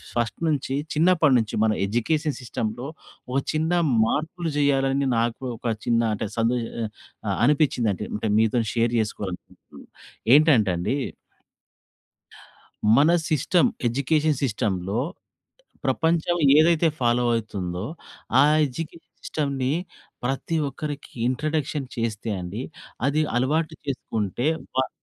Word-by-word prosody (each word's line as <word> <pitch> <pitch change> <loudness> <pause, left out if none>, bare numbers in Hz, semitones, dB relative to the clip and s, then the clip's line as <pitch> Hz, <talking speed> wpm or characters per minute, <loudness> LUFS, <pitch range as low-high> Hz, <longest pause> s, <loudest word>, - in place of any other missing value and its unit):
First 115 -3 -1
నుంచి 140 -3 0 0.2
చిన్నప్పటినుంచి 150 -9 +3
మన 110 - +3
ఎడ్యుకేషన్ 150 +8 0
సిస్టమ్‌లో 120 +1 -4 0.4
ఒక 135 - +2
చిన్న 160 +2 0 0.3
మార్పులు 160 +6 -2
చెయ్యాలని 135 -1 +2
నాకు 115 +2 -1
ఒక 115 -1 -1
చిన్న 115 -1 +3
అంటే 105 - -3
సందే 120 +2 +2 0.7
ఆహ్, - - 0
అనిపించిందండి 125 - +2
అంటే 105 +1 -2
మీతో 115 +2 +2
షేర్ 115 0 +1
చేసుకోవాలనుకుంటున్నాను. 100 -4 -7 0.5
ఏంటంటే 135 - +5
అండి 90 +11 -1 2.0
మన 150 +4 +5 0.2
సిస్టమ్, 170 +2 +3 0.2
ఎడ్యుకేషన్ 145 +4 +1
సిస్టమ్‌లో 105 -4 -1 0.9
ప్రపంచం 170 +1 +1 0.2
ఏదైతే 165 +1 +5
ఫాలో 120 0 +2
అవుతుందో 95 -4 -3 0.5
ఆ - - +8 0.3
ఎడ్యుకేషన్ 165 +5 -8
సిస్టమ్‌ని 140 -3 -1 0.5
ప్రతి 135 +6 -2
ఒక్కరికి 145 +1 -6 0.2
ఇంట్రడక్షన్ 150 0 -1
చేస్తే 115 -1 -3
అండి 90 +7 -5 0.5
అది 150 +2 +2 0.2
అలవాటు 155 +5 +1
చేసుకుంటే 120 -2 -2 0.3
వా 130 - +2
130 Hz, 105 wpm, -24 LUFS, 115-155 Hz, 2.0 s, ఆ